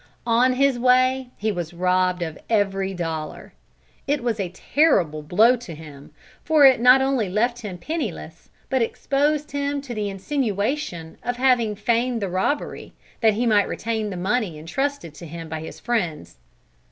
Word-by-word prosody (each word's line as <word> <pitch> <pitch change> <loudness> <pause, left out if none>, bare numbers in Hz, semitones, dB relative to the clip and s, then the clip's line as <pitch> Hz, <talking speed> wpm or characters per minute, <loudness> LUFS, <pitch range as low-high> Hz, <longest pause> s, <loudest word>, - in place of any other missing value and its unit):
On 240 +2 +3
his 270 -1 +2
way 255 +1 +3
he 215 +1 -1
was 175 -3 -5
robbed 180 0 +1
of 160 -2 -6
every 195 -3 +1
dollar. 165 -4 -5 0.5
It 285 -2 0
was 230 -3 -1
a 190 -3 -2
terrible 185 - +1
blow 210 +11 +4
to 185 -9 -9
him, 150 -3 -12 0.3
for 310 -3 +5
it 260 -3 +6
not 250 +2 +7
only 265 -7 0
left 235 +5 0
him 200 -5 -6
penniless, 320 - -5 0.2
but 260 -2 0
exposed 290 +5 0
him 285 0 -1
to 265 -3 -7
the 210 -2 -2
insinuation 200 - -3
of 245 0 -3
having 245 -4 +2
feigned 235 +3 0
the 200 -3 -3
robbery, 190 +11 -2 0.3
that 220 -3 +3
he 240 +3 0
might 210 -3 +3
retain 220 -1 -3
the 185 - -5
money 195 -2 -1
entrusted 175 - -3
to 170 +2 -10
him 165 +1 -8
by 160 0 -5
his 160 - -9
friends. 175 - -3
220 Hz, 165 wpm, -23 LUFS, 180-255 Hz, 0.5 s, not